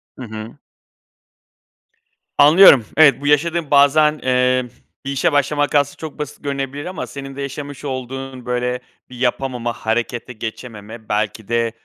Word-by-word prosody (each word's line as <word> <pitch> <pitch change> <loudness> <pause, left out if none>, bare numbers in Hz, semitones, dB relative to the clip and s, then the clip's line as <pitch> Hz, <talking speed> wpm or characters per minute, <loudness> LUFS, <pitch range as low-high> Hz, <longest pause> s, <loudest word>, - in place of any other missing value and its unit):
Hı 130 - -9
hı. 110 +3 -8 1.8
Anlıyorum, 145 - +8
evet, 145 -3 +6
bu 145 - -3
yaşadığın 160 +1 +1
bazen, 150 +2 +4
emm, 125 -1 +1 0.4
bir 140 - -3
işe 135 +2 +1
başlamak 145 +1 +1
aslında 145 0 +2
çok 160 -1 -8
basit 150 0 -7
görünebilir 140 +1 -4
ama 185 +1 -5
senin 135 -1 -8
de 140 - -6
yaşamış 140 +1 -7
olduğun 130 -1 -6
böyle 125 0 -1 0.3
bir 125 - -11
yapamama, 125 -1 -1
harekete 120 +3 -3
geçememe 110 -1 -8
belki 105 0 -2
de, 115 -1 0
135 Hz, 135 wpm, -19 LUFS, 120-145 Hz, 1.8 s, Anlıyorum